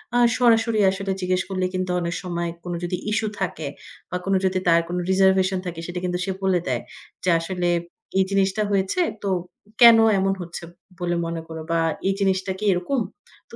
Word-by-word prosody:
আ -, -, +4 dB, 0.2 s
সরাসরি 230 Hz, -2 st, +3 dB
আসলে 195 Hz, 0 st, -3 dB
জিজ্ঞেস 185 Hz, 0 st, +1 dB
করলে 185 Hz, -1 st, -1 dB
কিন্তু 185 Hz, 0 st, -1 dB
অনেক 170 Hz, -1 st, -2 dB
সময় 170 Hz, -1 st, -2 dB
কোনো 175 Hz, -1 st, -4 dB
যদি 180 Hz, +1 st, -2 dB
ইশ্যু 220 Hz, 0 st, 0 dB
থাকে -, -, -3 dB, 0.4 s
বা 180 Hz, -, -2 dB
কোনো 195 Hz, 0 st, +2 dB
যদি 185 Hz, 0 st, +1 dB
তার 170 Hz, 0 st, +5 dB
কোন 175 Hz, -, -3 dB
রিজার্ভেশন 190 Hz, 0 st, +3 dB
থাকে 170 Hz, -2 st, -5 dB
সেটা 175 Hz, 0 st, -4 dB
কিন্তু 180 Hz, -1 st, -1 dB
সে 195 Hz, -, -2 dB
বলে 190 Hz, -2 st, +3 dB
দেয়, 125 Hz, -2 st, 0 dB, 0.4 s
যে 185 Hz, -, +1 dB
আসলে 175 Hz, +1 st, -2 dB, 0.5 s
এই 190 Hz, -, +5 dB
জিনিসটা 195 Hz, +1 st, +1 dB
হয়েছে 195 Hz, -, +1 dB, 0.2 s
তো 200 Hz, -, -1 dB, 0.5 s
কেন 235 Hz, -1 st, +10 dB, 0.2 s
এমন 195 Hz, 0 st, +2 dB
হচ্ছে? 170 Hz, 0 st, -7 dB, 0.4 s
বলে 175 Hz, -1 st, -1 dB
মনে 165 Hz, 0 st, -3 dB
কর 160 Hz, -, -7 dB
বা 165 Hz, -, +2 dB, 0.3 s
এই 195 Hz, -, +3 dB
জিনিসটা 190 Hz, -1 st, +1 dB
কি -, -, -6 dB
এরকম? 180 Hz, +10 st, -1 dB, 0.5 s
তো -, -, -11 dB
185 Hz, 185 wpm, -23 LUFS, 175-195 Hz, 0.5 s, কেন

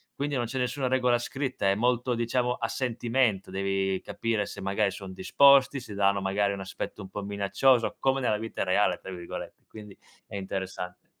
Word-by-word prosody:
Quindi 145 Hz, 0 st, -2 dB
non 120 Hz, -1 st, 0 dB
c'è 130 Hz, +3 st, -5 dB
nessuna 125 Hz, +2 st, -1 dB
regola 125 Hz, -1 st, +3 dB
scritta, 130 Hz, -5 st, -2 dB
è 100 Hz, -, +3 dB
molto 125 Hz, +2 st, +1 dB
diciamo 120 Hz, +1 st, 0 dB
a 115 Hz, -, -2 dB
sentimento, 120 Hz, -4 st, 0 dB
devi 95 Hz, 0 st, 0 dB
capire 110 Hz, -3 st, -1 dB
se -, -, -8 dB
magari 100 Hz, +1 st, +1 dB
son 95 Hz, -1 st, -8 dB
disposti, 135 Hz, +7 st, +5 dB
se 110 Hz, -4 st, -9 dB
danno 100 Hz, 0 st, +2 dB
magari 100 Hz, +1 st, +1 dB
un 100 Hz, -, -5 dB
aspetto 95 Hz, +2 st, -6 dB
un 95 Hz, -, -9 dB
po' 100 Hz, +1 st, -5 dB
minaccioso, 100 Hz, +5 st, +2 dB
"come 135 Hz, 0 st, +2 dB
nella 110 Hz, -4 st, +1 dB
vita 115 Hz, +1 st, -3 dB
reale", 100 Hz, +3 st, +2 dB
tra 95 Hz, -, -9 dB
virgolette, 85 Hz, -2 st, -8 dB
quindi 105 Hz, -3 st, -11 dB, 0.3 s
è -, -, -9 dB
interessante. 95 Hz, -1 st, -5 dB
105 Hz, 180 wpm, -28 LUFS, 95-125 Hz, 0.3 s, disposti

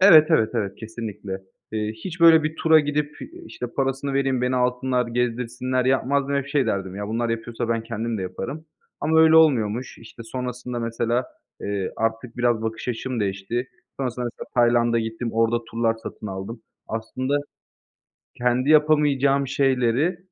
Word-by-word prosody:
Evet, 160 Hz, -6 st, +9 dB
evet, 110 Hz, -9 st, +4 dB
evet, 100 Hz, -4 st, -2 dB
kesinlikle. 110 Hz, -4 st, -6 dB, 0.3 s
Eee, 110 Hz, 0 st, -1 dB
hiç 175 Hz, -2 st, -6 dB
böyle 165 Hz, -2 st, +8 dB
bir 155 Hz, +1 st, -2 dB
tura 160 Hz, -1 st, +5 dB
gidip, 145 Hz, 0 st, -2 dB, 0.3 s
işte, 125 Hz, -, -6 dB
parasını 135 Hz, +2 st, -2 dB
vereyim, 135 Hz, -2 st, +1 dB
beni 125 Hz, 0 st, +1 dB
alsınlar 125 Hz, 0 st, +1 dB
gezdirsinler 125 Hz, +1 st, -1 dB
yapmazdım. 140 Hz, +2 st, +1 dB
Hep 140 Hz, -1 st, 0 dB
şey 145 Hz, -4 st, +1 dB
derdim, 95 Hz, -3 st, -2 dB
"Ya, 105 Hz, +1 st, -5 dB
bunlar 115 Hz, +1 st, -1 dB
yapıyorsa 115 Hz, 0 st, -3 dB
ben 115 Hz, -1 st, 0 dB
kendim 115 Hz, -1 st, -3 dB
de -, -, -3 dB
yaparım." 140 Hz, -, -6 dB, 0.3 s
Ama 160 Hz, +2 st, +3 dB
öyle 160 Hz, 0 st, +7 dB
olmuyormuş. 125 Hz, -6 st, +3 dB
İşte, 115 Hz, 0 st, -12 dB
sonrasında 125 Hz, +1 st, -5 dB
mesela, 115 Hz, +1 st, -1 dB, 0.4 s
eee, 100 Hz, -2 st, -3 dB
artık 115 Hz, +2 st, -2 dB
biraz 120 Hz, -2 st, +1 dB
bakış 110 Hz, +2 st, -4 dB
açım 125 Hz, 0 st, -3 dB
değişti. 100 Hz, +6 st, -2 dB, 0.3 s
Sonrasında 125 Hz, -2 st, -3 dB
mesela -, -, -9 dB
Tayland'a 120 Hz, -1 st, +3 dB
gittim, 115 Hz, +1 st, -3 dB
orada 115 Hz, +1 st, +1 dB
turlar 115 Hz, 0 st, +1 dB
satın -, -, -7 dB
aldım. 100 Hz, +4 st, -6 dB, 0.2 s
Aslında 130 Hz, +5 st, -2 dB, 1.0 s
kendi 125 Hz, +3 st, +1 dB
yapamayacağım 145 Hz, -3 st, +4 dB
şeyleri 135 Hz, +5 st, +1 dB
125 Hz, 150 wpm, -23 LUFS, 115-135 Hz, 1.0 s, Evet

